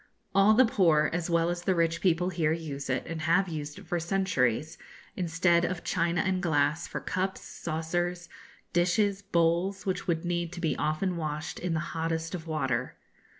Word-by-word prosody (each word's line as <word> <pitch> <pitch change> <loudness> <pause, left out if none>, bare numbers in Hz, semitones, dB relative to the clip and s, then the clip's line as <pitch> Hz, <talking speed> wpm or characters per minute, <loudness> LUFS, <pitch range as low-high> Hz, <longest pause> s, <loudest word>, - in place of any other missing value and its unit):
All 200 +2 +6
the 260 +3 +7
poor 165 -9 +3
as 175 0 -2
well 170 0 +2
as 175 0 -3
the 185 +1 +1
rich 165 -1 +1
people 180 -1 +2
here 165 -4 +1
use 150 -4 -4
it, - - 0
and 165 -1 -5
have 170 +5 +3
used 150 -3 -5
it - - -11
for 175 - -1
centuries, 160 - 0 0.4
instead 170 -1 +2
of 180 0 -2
china 170 -1 +1
and 190 -1 0
glass, 150 -1 +1
for - - -4
cups, 190 +2 -2
saucers, 175 +2 -3 0.5
dishes, 195 +3 +2
bowls, 180 0 +1
which 190 0 -2
would 165 -1 0
need 175 -1 -1
to 175 - -6
be 165 -3 0
often 160 +4 -1
washed 155 -1 -4
in 175 -2 -1
the - - +1
hottest 165 0 -2
of 165 -2 -5
water. 130 -6 -1
170 Hz, 180 wpm, -29 LUFS, 160-180 Hz, 0.5 s, the